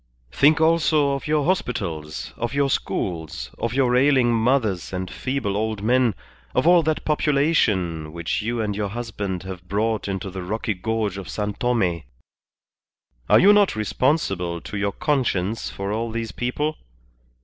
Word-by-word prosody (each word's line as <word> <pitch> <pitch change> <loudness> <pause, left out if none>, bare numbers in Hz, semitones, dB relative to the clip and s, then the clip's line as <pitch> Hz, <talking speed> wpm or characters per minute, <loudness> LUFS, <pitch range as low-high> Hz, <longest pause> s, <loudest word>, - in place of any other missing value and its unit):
"Think 150 - +4
also 160 -3 +3
of 140 +1 -3
your 150 -2 +1
hospitals, 85 - -2
of 120 +3 -3
your 140 -1 +2
schools, 80 - -3
of 115 +1 -2
your 125 -2 +3
ailing 130 -2 +4
mothers 115 -5 +1
and 90 -1 -4
feeble 130 -7 -2
old 110 -1 -2
men, 120 -2 +3 0.4
of 130 - +2
all 175 0 +6
that 155 -1 -1
population 125 - +1
which 85 +4 -2
you 115 +2 -2
and 105 -2 -2
your 105 0 -1
husband 105 -5 -4
have 90 -1 -8
brought 110 +2 -1
into 95 -1 -4
the 95 0 -6
rocky 110 +4 -2
gorge 105 0 -2
of 95 - -8
San 105 -1 -2
Tome. 100 -9 0 1.3
Are - - +7
you 200 +2 +7
not 205 - +4
responsible 105 - 0
to - - -8
your 100 0 0
conscience 115 - -1
for 100 +1 -4
all 115 +2 -2
these 115 0 -4
people? 145 +6 -2
115 Hz, 155 wpm, -23 LUFS, 95-140 Hz, 1.3 s, Are